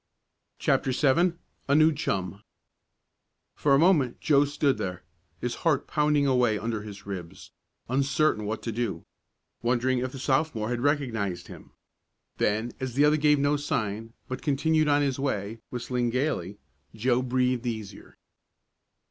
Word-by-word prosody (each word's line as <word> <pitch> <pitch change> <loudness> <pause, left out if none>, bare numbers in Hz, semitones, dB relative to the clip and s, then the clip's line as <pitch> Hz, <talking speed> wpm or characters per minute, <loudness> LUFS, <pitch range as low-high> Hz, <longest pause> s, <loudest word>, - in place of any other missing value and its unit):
CHAPTER 130 - +1
VII 160 +6 +3 0.3
A 140 - +3
NEW 155 +1 +5
CHUM 100 -8 -3 1.1
For 140 -2 +3
a - - +5
moment 150 -6 +3
Joe 145 -2 +4
stood 145 -1 0
there, 90 -1 -4 0.4
his 120 -1 -2
heart 150 -5 +2
pounding 150 -1 +2
away 125 -5 +3
under 110 +1 -3
his 105 -1 -10
ribs, 95 -4 -8 0.4
uncertain 135 -2 +1
what 110 +1 -4
to 115 - -2
do 110 -7 -3 0.6
wondering 125 +1 +1
if 130 +1 -3
the 135 - -8
Sophomore 130 -4 0
had 120 -1 -2
recognized 120 -10 -1
him. - - -12 0.7
Then, 110 +3 0
as 130 -3 -4
the 145 +2 +5
other 150 +1 +4
gave 150 0 +4
no 145 +1 +2
sign, 115 -7 -3
but 130 -1 -5
continued 155 +2 +2
on 145 0 +3
his 135 -2 -1
way, 115 -5 -2
whistling 125 0 -2
gaily, 115 - -1 0.4
Joe 120 +3 +1
breathed 125 -1 0
easier. 110 -4 -6
130 Hz, 145 wpm, -27 LUFS, 110-145 Hz, 1.1 s, NEW